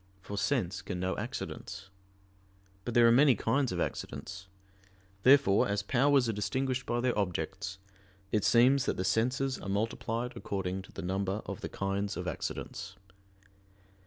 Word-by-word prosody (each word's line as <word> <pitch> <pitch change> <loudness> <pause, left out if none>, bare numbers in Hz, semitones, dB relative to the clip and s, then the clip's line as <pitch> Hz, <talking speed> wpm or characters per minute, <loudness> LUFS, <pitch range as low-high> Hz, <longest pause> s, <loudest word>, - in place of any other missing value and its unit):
For 95 +2 -7
sense 100 -6 0
can 95 -1 -5
know 95 +1 -1
accidents. 95 +1 -6 0.9
But 120 - -3
there 120 -1 +7
are - - +6
many 135 +1 +6
kinds 130 +6 +1
of 90 - -2
accidents. 95 +6 -4 0.7
Therefore, 130 -5 +5
as 100 0 -1
powers 135 +3 +3
are 115 - 0
distinguished 130 +5 -1
by 120 0 0
their 125 -1 +1
objects, 95 0 -2 0.5
it 105 - +1
seems 130 +3 +5
that - - 0
the 95 - -1
senses 125 +7 +1
are 100 - -6
multiplied 115 +4 -2
according 95 -4 -3
to 95 - -15
the - - -7
number 95 +3 -1
of - - -6
the - - -4
kinds 100 +1 -2
of - - -4
accidents. 95 - -5
105 Hz, 155 wpm, -31 LUFS, 95-125 Hz, 0.9 s, there